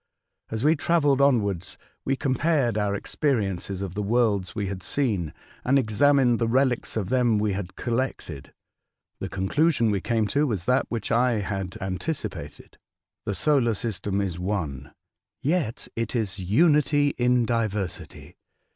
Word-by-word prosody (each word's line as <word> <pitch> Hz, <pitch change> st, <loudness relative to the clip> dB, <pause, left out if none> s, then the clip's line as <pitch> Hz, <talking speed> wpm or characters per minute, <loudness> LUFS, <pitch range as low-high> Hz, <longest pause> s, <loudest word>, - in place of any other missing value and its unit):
As 110 Hz, +1 st, -3 dB
we 155 Hz, +2 st, +5 dB
travelled 145 Hz, -4 st, +2 dB
onwards, 100 Hz, -10 st, +1 dB, 0.3 s
we 135 Hz, -, +1 dB
compared 135 Hz, -2 st, +1 dB
our 105 Hz, -1 st, 0 dB
experiences 100 Hz, -, -1 dB
of 95 Hz, -3 st, -5 dB
the 105 Hz, -, -2 dB
worlds 105 Hz, -3 st, +1 dB
we 105 Hz, -2 st, -1 dB
had 95 Hz, -1 st, -5 dB
seen, 100 Hz, -, -1 dB, 0.3 s
and 135 Hz, +2 st, +3 dB
examined 130 Hz, +1 st, +3 dB
the 115 Hz, -, +1 dB
relics 125 Hz, -1 st, +1 dB
of 100 Hz, -3 st, -2 dB
them 125 Hz, -4 st, +3 dB
we 105 Hz, -1 st, 0 dB
had 95 Hz, -2 st, -5 dB
collected. 115 Hz, -, -3 dB, 0.7 s
The 95 Hz, -, -4 dB
conclusion 115 Hz, -, +1 dB
we 100 Hz, -2 st, 0 dB
came 115 Hz, +1 st, +1 dB
to 150 Hz, +1 st, +2 dB
was 100 Hz, -8 st, -2 dB
that 125 Hz, +4 st, +2 dB
which 115 Hz, -4 st, -3 dB
I 120 Hz, +2 st, +3 dB
had 100 Hz, -2 st, -3 dB
anticipated: 95 Hz, -, -5 dB, 0.5 s
the 100 Hz, -, -1 dB
solar 130 Hz, -6 st, +2 dB
system 100 Hz, -2 st, -2 dB
is 90 Hz, -3 st, -3 dB
one, 85 Hz, -9 st, -3 dB, 0.5 s
yet 150 Hz, -6 st, -1 dB
it 115 Hz, +1 st, -3 dB
is 105 Hz, -4 st, -1 dB
unity 145 Hz, -, +3 dB
in 125 Hz, -1 st, +3 dB
diversity. 105 Hz, -5 st, -3 dB
115 Hz, 145 wpm, -25 LUFS, 100-130 Hz, 0.7 s, we